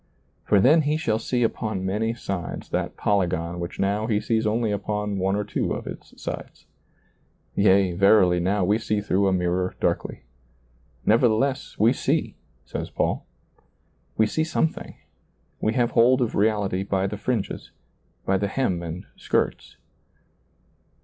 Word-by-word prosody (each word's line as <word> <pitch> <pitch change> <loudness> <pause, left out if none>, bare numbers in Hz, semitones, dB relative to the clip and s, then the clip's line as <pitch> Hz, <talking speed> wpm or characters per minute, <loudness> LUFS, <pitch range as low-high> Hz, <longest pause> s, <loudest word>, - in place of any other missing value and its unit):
For 100 - +4
then 150 +10 +6
he 150 +1 0
shall 110 -8 0
see 120 +1 0
upon 110 -4 -2
many 110 +4 -1
sides 95 -6 -5
that - - -2
polygon 85 -4 0
which 85 0 -5
now 100 +3 0
he 105 -3 +1
sees 110 0 0
only 110 0 +1
upon 105 0 -2
one 95 +1 +1
or 105 - 0
two 105 - -2
of - - -5
its - - -10
sides. - - -7 0.9
Yea, 100 -2 +4
verily 95 -1 +4
now 95 +2 +1
we 105 +4 +2
see 110 -2 -1
through 100 -1 +1
a - - +3
mirror 90 0 0
darkly. - - -1 0.8
Nevertheless 120 +4 +2
we 115 +3 +4
see, - - -1 0.3
says - - -5
Paul. - - -1 0.9
We 110 - +5
see 155 +8 0
some 160 0 +1
thing, - - -10 0.6
we 110 - 0
have 120 -2 +2
hold 125 +2 +5
of 120 -3 0
reality 100 -3 +1
by 95 -1 0
the 100 +2 -3
fringes, 110 0 -3 0.6
by 95 0 +2
the 100 - 0
hem 100 -6 -1
and 85 +1 -6
skirts. - - -2
105 Hz, 150 wpm, -24 LUFS, 95-115 Hz, 0.9 s, then